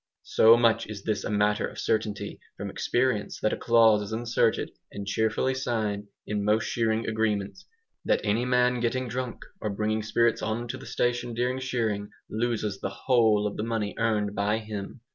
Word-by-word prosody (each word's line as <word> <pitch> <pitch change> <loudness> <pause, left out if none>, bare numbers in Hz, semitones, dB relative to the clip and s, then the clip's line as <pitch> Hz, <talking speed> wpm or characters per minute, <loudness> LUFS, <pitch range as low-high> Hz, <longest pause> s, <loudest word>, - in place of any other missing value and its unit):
So 115 +1 +6
much 115 -2 +3
is 100 -2 -7
this 110 -2 -1
a - - -3
matter 105 0 +2
of - - -11
certainty 110 -2 -2 0.2
from - - -5
experience 120 -4 0
that 110 - +1
a - - +1
clause 115 -3 +5
is 105 +1 -6
inserted, 115 0 +1 0.2
and 100 - -6
cheerfully 110 +5 +1
signed, 110 -5 -2 0.2
in 105 -1 -2
most 105 +2 +2
shearing 115 -1 0
agreements, 110 - -1 0.4
"that - - +2
any 105 +3 +1
man 125 0 +2
getting 125 +2 -1
drunk 125 -1 -4 0.2
or 105 - -1
bringing 110 +2 -1
spirits 115 +2 +2
on 115 +2 -2
to 130 - -3
the - - -11
station 120 -1 -1
during 125 +2 0
shearing, 115 -6 -1 0.2
LOSES 110 -3 -1
THE - - -2
WHOLE 110 -1 +3
OF 105 - -3
the 105 - -2
money 110 -3 -2
earned 105 -3 +1
by 105 +1 +1
him." 110 +1 -6
110 Hz, 180 wpm, -27 LUFS, 105-120 Hz, 0.4 s, So